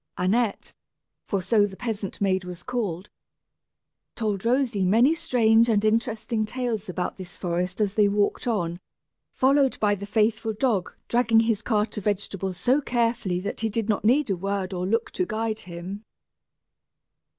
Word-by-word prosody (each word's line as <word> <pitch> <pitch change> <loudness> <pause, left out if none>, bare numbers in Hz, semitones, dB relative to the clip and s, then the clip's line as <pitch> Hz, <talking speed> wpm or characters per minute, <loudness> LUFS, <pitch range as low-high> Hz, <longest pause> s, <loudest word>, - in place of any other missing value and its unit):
Annette, 205 +4 0 0.5
for 195 -3 -1
so 205 +2 +3
the 190 - -10
peasant 215 -5 -4
maid 190 -2 +1
was 180 -1 -8
called, 210 -7 -3 1.0
told 210 -4 -2
Rosy 240 -4 +1
many 230 - +4
strange 235 -8 +3
and 215 -1 +2
interesting 225 0 0
tales 220 -3 -3
about 180 0 -3
this 185 -1 -10
forest 180 +1 -2
as 205 -2 +1
they 210 -1 +4
walked 205 +3 0
on, 175 -7 -1 0.5
followed 270 0 +2
by 205 -1 +3
the 200 0 -5
faithful 220 +1 +1
dog 215 -5 0 0.2
dragging 235 -2 +4
his 225 -2 0
cart 215 -2 0
of 210 - -5
vegetables 195 -2 -2
so 255 +10 +2
carefully 230 -8 0
that 200 - -4
he 225 - 0
did 225 0 -2
not 210 - +1
need 250 +2 +3
a - - +2
word 195 +1 -3
or 180 0 -2
look 225 +3 0
to 365 - -1
guide 220 -7 -2
him. 180 +3 -7
215 Hz, 160 wpm, -25 LUFS, 190-230 Hz, 1.0 s, many